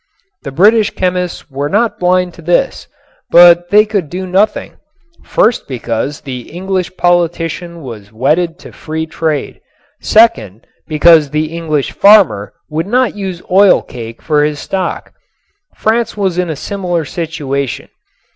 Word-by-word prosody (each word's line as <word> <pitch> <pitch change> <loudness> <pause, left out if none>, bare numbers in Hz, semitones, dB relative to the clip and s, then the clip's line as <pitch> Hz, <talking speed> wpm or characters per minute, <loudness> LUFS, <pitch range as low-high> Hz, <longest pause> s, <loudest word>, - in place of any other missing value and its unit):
The 140 - -7
British 210 +8 +4
chemists 180 -4 -3
were 140 +2 -3
not 220 +5 0
blind 180 0 +1
to 170 - -14
this, 175 - 0 0.4
but 175 0 +6
they 210 +1 +5
could 200 -8 -2
do 185 +3 -5
nothing, 195 +4 0 0.5
first 225 +2 +1
because 130 +2 -4
the 125 -3 -8
English 185 +1 -4
politician 170 -1 -1
was 105 -5 -10
wedded 155 +9 0
to - - -10
free 160 0 -5
trade, 155 -2 -3 0.4
second, 115 - +2 0.2
because 155 -1 +4
the 155 +2 -2
English 155 -4 -2
farmer 175 - +4 0.2
would 160 +3 -3
not 250 +1 +1
use 190 -4 -6
oil 195 +1 +5
cake 115 -2 -10
for 150 -2 +2
his 150 0 -1
stock. 185 +3 -4 0.6
France 225 0 -1
was 190 -3 -1
in 180 -2 -1
a 160 - -3
similar 175 -1 -3
situation. 145 -5 -4
170 Hz, 135 wpm, -14 LUFS, 150-190 Hz, 0.6 s, but